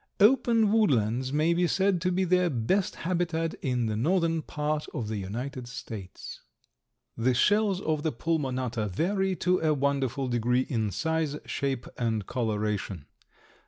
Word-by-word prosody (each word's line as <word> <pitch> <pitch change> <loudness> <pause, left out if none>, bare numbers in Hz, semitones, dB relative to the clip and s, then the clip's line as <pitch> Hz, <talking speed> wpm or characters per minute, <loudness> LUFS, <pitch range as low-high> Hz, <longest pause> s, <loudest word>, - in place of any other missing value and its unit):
Open 225 -1 +4
woodlands 130 - +2
may 155 +3 +2
be 175 +1 +2
said 190 -1 +1
to 180 +1 +1
be 185 +1 +1
their 180 0 +3
best 150 - 0
habitat 170 -2 0
in 125 -3 0
the 110 -1 -1
northern 165 - +1
part 150 0 -2
of 110 -3 -3
the 110 - -2
United 120 +6 -5
States. 110 -6 -8 0.7
The 125 +2 +1
shells 205 - +3
of 155 -1 0
the 160 0 0
Pulmonata 130 -6 -1
vary 190 - 0
to 180 +1 +1
a 155 -1 +2
wonderful 135 -1 0
degree 125 +1 +1
in 110 -5 0
size, 160 - -1
shape 135 -3 -2
and 110 -4 0
coloration. 105 - -2
140 Hz, 145 wpm, -28 LUFS, 120-175 Hz, 0.7 s, Open